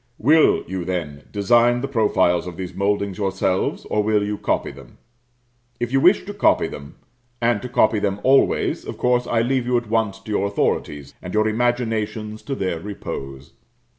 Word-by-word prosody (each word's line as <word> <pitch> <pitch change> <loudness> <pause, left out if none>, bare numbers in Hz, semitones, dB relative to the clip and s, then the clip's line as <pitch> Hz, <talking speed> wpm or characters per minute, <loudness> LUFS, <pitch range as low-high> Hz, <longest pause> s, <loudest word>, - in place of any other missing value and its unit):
Will, 155 +7 +4
you, 95 -1 -4
then, 85 -5 -4
design 120 +4 +3
the 135 - -2
profiles 105 -8 +1
of 85 -2 -8
these 95 -1 -6
mouldings 100 0 -1
yourselves, 95 -1 -1
or 105 - 0
will 105 0 +1
you 105 +1 -2
copy - - -1
them? 65 -3 -15 0.8
If 120 0 -2
you 135 - +3
wish 185 +6 +4
to 205 - -6
copy 200 - +3
them, 70 0 -10 0.4
and 115 -3 +1
to 125 - -6
copy 110 -2 +3
them 100 0 -1
always, 135 +1 +2
of - - -7
course 125 0 +1
I 115 -1 +1
leave 125 0 0
you 125 -1 +2
at 120 -2 -4
once 110 -3 0
to 110 - -8
your 100 -1 +1
authorities, 75 -7 -2
and 90 +3 -6
your 110 0 +3
imaginations 110 -2 -1
to 140 - -3
their 95 -7 -2
repose. 70 -7 -7
105 Hz, 180 wpm, -21 LUFS, 95-120 Hz, 0.8 s, Will